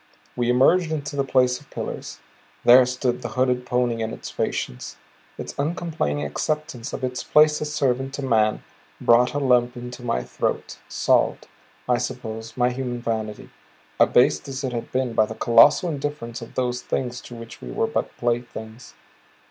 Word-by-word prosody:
We 120 Hz, -1 st, 0 dB
emerged 155 Hz, +7 st, +4 dB
into 145 Hz, -2 st, -3 dB
the 140 Hz, -, +1 dB
place 125 Hz, -1 st, +2 dB
of 145 Hz, -, -20 dB
pillars. -, -, -6 dB, 0.5 s
There 125 Hz, +1 st, +8 dB
stood 125 Hz, -1 st, -1 dB
the -, -, -3 dB
hooded 125 Hz, -1 st, +1 dB
pony 125 Hz, -2 st, 0 dB
and 110 Hz, 0 st, -2 dB
its -, -, -8 dB
patience, 60 Hz, -, -3 dB, 0.4 s
its -, -, -6 dB
uncomplaining 145 Hz, -, -1 dB
acceptance 150 Hz, -, -3 dB
of -, -, -6 dB
its 125 Hz, -1 st, -2 dB
place 150 Hz, 0 st, +4 dB
as 150 Hz, 0 st, -3 dB
servant 135 Hz, -2 st, 0 dB
to 140 Hz, -, -5 dB
man 110 Hz, -4 st, +2 dB, 0.4 s
brought 120 Hz, +3 st, +4 dB
a -, -, +1 dB
lump 125 Hz, -3 st, +2 dB
into 125 Hz, +1 st, -8 dB
my 115 Hz, -, -1 dB
throat, -, -, -3 dB
salved, -, -, +1 dB, 0.4 s
I 125 Hz, -1 st, +2 dB
suppose, 115 Hz, -2 st, -5 dB
my 125 Hz, 0 st, +3 dB
human 125 Hz, -1 st, -3 dB
vanity, 110 Hz, -3 st, -4 dB, 0.5 s
abased 75 Hz, 0 st, +4 dB
as 135 Hz, 0 st, -5 dB
it 130 Hz, -2 st, -2 dB
had 115 Hz, -1 st, -5 dB
been 130 Hz, -2 st, -1 dB
by 110 Hz, -1 st, +3 dB
the 110 Hz, -, -7 dB
colossal 135 Hz, +10 st, +5 dB
indifference 140 Hz, -6 st, -4 dB
of 115 Hz, -, -10 dB
those 125 Hz, -1 st, -1 dB
things 125 Hz, -1 st, -3 dB
to 120 Hz, -, -10 dB
which 115 Hz, 0 st, -10 dB
we 60 Hz, -, -8 dB
were -, -, 0 dB
but -, -, -3 dB
playthings. 120 Hz, -1 st, -4 dB
125 Hz, 170 wpm, -23 LUFS, 115-135 Hz, 0.5 s, There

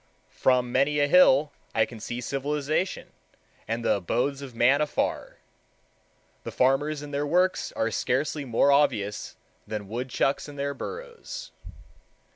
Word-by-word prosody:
From 125 Hz, -1 st, +2 dB
many 140 Hz, +4 st, +2 dB
a 145 Hz, -, +3 dB
hill 150 Hz, -3 st, +5 dB, 0.2 s
I 110 Hz, -, +4 dB
can 115 Hz, 0 st, -11 dB
see 120 Hz, +3 st, -5 dB
civilization 145 Hz, +7 st, -2 dB, 0.6 s
and 115 Hz, +1 st, -3 dB
the -, -, +3 dB
abodes 125 Hz, +9 st, -1 dB
of 130 Hz, -4 st, -9 dB
man 130 Hz, +5 st, +4 dB
afar. 150 Hz, -, -2 dB, 1.1 s
The -, -, -6 dB
farmers 145 Hz, +3 st, +1 dB
and 145 Hz, 0 st, -9 dB
their 145 Hz, +1 st, -1 dB
works 180 Hz, +4 st, +1 dB
are 115 Hz, 0 st, -1 dB
scarcely 145 Hz, +5 st, -1 dB
more 130 Hz, +2 st, +3 dB
obvious 105 Hz, -8 st, +1 dB, 0.3 s
than 105 Hz, -2 st, -5 dB
woodchucks 125 Hz, +5 st, -1 dB
and 145 Hz, -1 st, -10 dB
their 140 Hz, 0 st, -2 dB
burrows. -, -, -8 dB
140 Hz, 135 wpm, -26 LUFS, 120-150 Hz, 1.1 s, hill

